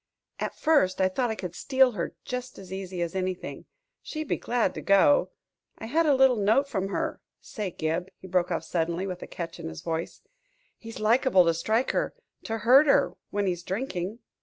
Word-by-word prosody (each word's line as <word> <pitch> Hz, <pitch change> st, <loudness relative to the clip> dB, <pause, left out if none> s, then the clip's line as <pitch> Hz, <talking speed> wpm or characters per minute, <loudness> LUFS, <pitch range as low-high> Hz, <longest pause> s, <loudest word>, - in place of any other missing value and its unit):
"At -, -, -3 dB
first 290 Hz, -13 st, +3 dB
I 190 Hz, 0 st, +3 dB
thought 245 Hz, +5 st, -1 dB
I 220 Hz, -, -2 dB
could 180 Hz, -5 st, -6 dB
steal 260 Hz, +5 st, +3 dB
her 180 Hz, -7 st, -4 dB
just 250 Hz, 0 st, -5 dB
as 190 Hz, -1 st, -9 dB
easy 185 Hz, -2 st, -4 dB
as 170 Hz, -, -4 dB
anything. 185 Hz, -1 st, -4 dB, 0.4 s
She'd 310 Hz, -1 st, -5 dB
be -, -, +2 dB
glad 240 Hz, -1 st, 0 dB
to -, -, -6 dB
go; 200 Hz, +9 st, +4 dB, 0.5 s
I -, -, -7 dB
had 315 Hz, +8 st, +2 dB
a 285 Hz, -, +5 dB
little 265 Hz, -2 st, +5 dB
note 220 Hz, +7 st, +3 dB
from 195 Hz, -8 st, -2 dB
her 195 Hz, -, -3 dB, 0.2 s
Say, 210 Hz, -4 st, -5 dB
Gib," 165 Hz, +2 st, -2 dB
he -, -, -14 dB
broke 180 Hz, -1 st, +1 dB
off 170 Hz, -, -2 dB
suddenly, 170 Hz, +2 st, -1 dB
with 180 Hz, -2 st, -5 dB
a -, -, -7 dB
catch 170 Hz, -1 st, -6 dB
in -, -, -5 dB
his 80 Hz, -1 st, -8 dB
voice, 165 Hz, 0 st, -4 dB, 0.6 s
"he's 225 Hz, 0 st, -9 dB
liable 220 Hz, -3 st, +4 dB
to 165 Hz, -, +3 dB
strike 220 Hz, +9 st, 0 dB
her -, -, -1 dB, 0.3 s
to 225 Hz, -, -2 dB
hurt 260 Hz, +7 st, +6 dB
her 180 Hz, -10 st, +4 dB, 0.2 s
when 205 Hz, 0 st, -1 dB
he's 175 Hz, -2 st, -1 dB
drinking." 190 Hz, 0 st, -3 dB
195 Hz, 200 wpm, -27 LUFS, 180-250 Hz, 0.6 s, hurt